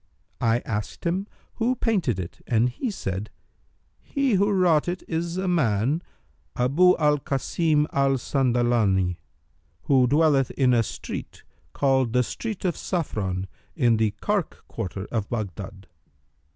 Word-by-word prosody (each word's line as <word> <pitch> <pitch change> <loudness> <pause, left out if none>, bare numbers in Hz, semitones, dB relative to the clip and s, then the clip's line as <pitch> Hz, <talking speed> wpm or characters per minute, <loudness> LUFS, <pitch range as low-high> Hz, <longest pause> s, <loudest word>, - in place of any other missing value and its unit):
I 115 +1 +2
asked 105 +7 -4
him 185 +4 0 0.3
who 240 +3 +1
painted 185 - 0
it 90 -2 -7
and 120 +1 +3
he 240 - -3
said, 100 - -4 0.7
'He 275 -4 0
who 200 +2 +3
wrought 180 -6 +3
it 175 +1 -3
is 170 +1 -2
a 190 0 -1
man, 140 - +1 0.5
Abu 155 +9 +4
al 150 -2 +3
Kasim 150 +3 +1
al 140 0 +3
Sandalani 120 -8 +2
hight, 90 - -6 0.6
who 130 +1 +4
dwelleth 145 -1 +3
in 130 -2 +4
a 120 - +4
street 115 - -6 0.3
called 130 -4 +2
the 125 0 +4
Street 215 - -5
of 175 - +1
Saffron 95 - -2 0.3
in 120 -7 +3
the 110 -1 +1
Karkh 200 -5 -2
quarter 100 -3 -5
of 110 -3 -2
Baghdad.' 100 -3 -5
135 Hz, 140 wpm, -25 LUFS, 110-175 Hz, 0.7 s, Abu